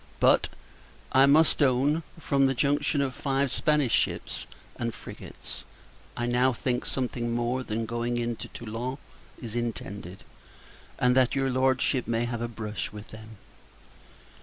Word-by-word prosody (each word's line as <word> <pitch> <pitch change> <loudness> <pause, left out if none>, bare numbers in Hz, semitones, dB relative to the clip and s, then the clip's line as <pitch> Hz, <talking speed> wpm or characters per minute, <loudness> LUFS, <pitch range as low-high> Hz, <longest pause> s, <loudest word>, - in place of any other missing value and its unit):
But, - - +4 0.6
I 135 +1 +6
must 155 +3 +5
own, 140 +4 +3 0.2
from 140 -4 +3
the 135 - 0
junction 145 +2 +2
of 135 -2 -1
five 135 0 0
Spanish 150 -5 +2
ships - - 0 0.3
and 115 -1 -2
frigates, - - -9 0.5
I 120 - 0
now 125 +2 +3
think, 125 0 -1
something 120 -2 -1
more 120 +2 0
than 115 -2 -2
going 120 +1 -1
into 120 -1 -3
Toulon 120 +3 -5 0.4
is 115 -3 -7
intended, 100 -5 -4 0.7
and 125 0 +3
that 130 -1 +4
your 135 -1 +1
Lordship 130 0 +2
may 115 0 +1
have 120 -1 -3
a 120 - -1
brush 110 -2 -4
with 105 0 -10
them. 110 0 -11
125 Hz, 140 wpm, -28 LUFS, 115-135 Hz, 0.7 s, I